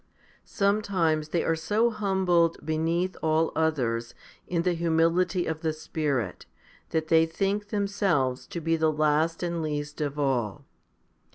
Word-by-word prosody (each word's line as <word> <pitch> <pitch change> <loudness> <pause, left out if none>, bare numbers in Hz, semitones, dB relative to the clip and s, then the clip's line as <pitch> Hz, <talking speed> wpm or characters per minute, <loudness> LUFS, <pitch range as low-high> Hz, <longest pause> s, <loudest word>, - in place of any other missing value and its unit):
Sometimes 190 -7 0
they 170 - 0
are 165 - +1
so 210 +9 +1
humbled 190 -5 +2
beneath 165 +4 0
all 160 +1 +2
others 120 -8 0 0.3
in 170 -1 0
the 180 0 +2
humility 170 +2 +1
of 160 -1 -3
the 160 -1 0
Spirit, 145 - -3 0.4
that 160 -1 -1
they 165 0 +5
think 195 +5 -1
themselves 195 - 0
to 170 - -5
be 165 0 +1
the 160 -1 +2
last 155 +2 +1
and 170 -1 -2
least 150 -1 -4
of 145 -1 -2
all. 125 -8 -1
160 Hz, 135 wpm, -27 LUFS, 155-180 Hz, 0.4 s, they